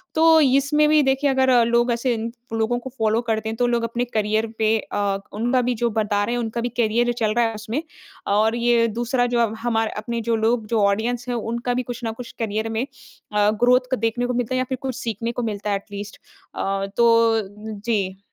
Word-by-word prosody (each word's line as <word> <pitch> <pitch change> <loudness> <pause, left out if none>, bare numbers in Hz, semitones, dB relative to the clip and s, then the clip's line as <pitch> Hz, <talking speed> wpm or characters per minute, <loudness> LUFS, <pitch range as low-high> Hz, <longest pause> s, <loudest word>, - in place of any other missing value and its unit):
तो 320 0 +6
इसमें 280 +2 +3
भी 305 0 +5
देखिए 270 +1 +2
अगर 265 -1 +2 0.2
लोग 235 +1 +2
ऐसे 240 +1 0
इं 225 0 -3 0.3
लोगों 225 +2 +1
को 260 +2 -8
फ़ॉलो 220 0 +2
करते 220 -2 -2
हैं, 220 - -3
तो 245 +1 +1
लोग 235 -1 0
अपने 235 +2 -1
करियर 215 -1 0
पे 220 0 +2
अ, 200 -2 -2 0.2
उनका 245 +4 +1
भी 250 0 0
जो 235 +1 0
बता 210 -2 0
रहे 235 +4 -1
हैं, - - -1
उनका 225 +1 -3
भी 245 - -1
करियर 240 +1 +2
चल 215 -1 +1
रहा 240 0 +3
है 225 - -1
उसमें 215 +7 -3 0.5
और 215 +3 +2
ये 235 -1 +3
दूसरा 240 +3 0
जो 240 - +2
अब 230 -2 +1
हमार 225 -1 0
अपने 235 +2 -3
जो 230 +1 0
लोग 225 0 +1
जो 225 -1 +1
ऑडियंस 230 +4 0
है 245 - -1
उनका 235 +2 -2
भी 250 +1 -1
कुछ 245 0 -7
न 225 - -1
कुछ 250 - -8
करियर 220 0 -2
में 225 +3 -1 0.5
अ, 210 0 +3
ग्रोथ 245 +3 +4
क - - -28
को - - +3
देखने 230 +2 -1
को 250 - -1
मिलता 245 +1 -1
है - - +1
या 255 - +1
फिर 260 - -2
कुछ 260 -2 -3
सीखने 230 -2 -3
को 240 +1 -4
मिलता 210 -2 -3
है 200 - +2
एट 195 - -6
लीस्ट 205 0 -7 0.4
अ, 195 0 -1
तो 230 -1 +4 0.4
जी। 200 -4 -2
230 Hz, 235 wpm, -22 LUFS, 220-245 Hz, 0.5 s, तो